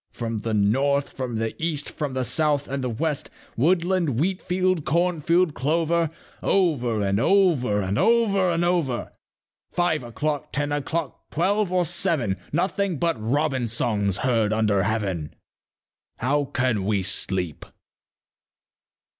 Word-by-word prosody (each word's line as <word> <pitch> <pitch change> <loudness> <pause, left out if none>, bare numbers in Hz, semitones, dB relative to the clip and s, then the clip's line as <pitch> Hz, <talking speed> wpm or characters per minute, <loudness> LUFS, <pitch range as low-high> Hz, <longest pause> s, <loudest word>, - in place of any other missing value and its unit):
"From 115 -2 -3
the 110 +1 -2
north, 135 +8 +2
from 125 -3 -4
the 115 0 -2
east, 150 -3 -2
from 145 -4 -4
the 130 0 -1
south 150 0 +1
and 135 0 -3
the 125 - -1
west, 150 +5 -2 0.3
Woodland, 170 -1 +1
wheat 185 +4 0
field, 185 -2 0
corn 170 +4 +1
field, 170 0 +2
clover, 165 +4 +1 0.3
Over 125 - +1
and 100 +1 +1
over 140 - +3
and 95 +2 -1
over 210 -5 +3
and 170 0 +1
over, 165 -9 0 0.6
Five 175 -4 +1
o'clock, 145 +5 -3
ten 145 0 -1
o'clock, 145 +1 -3
twelve 195 +4 +1
or 180 -1 +2
seven, 160 - 0
Nothing 185 +2 0
but 170 +3 +1
robin 130 +1 0
songs 105 -4 0
heard 115 -4 +2
under 105 -3 +2
heaven: 95 -8 -2 0.8
How 145 +4 +1
can 125 -6 0
we 100 -2 +1
sleep?" 90 -3 -1
145 Hz, 135 wpm, -24 LUFS, 115-170 Hz, 0.8 s, over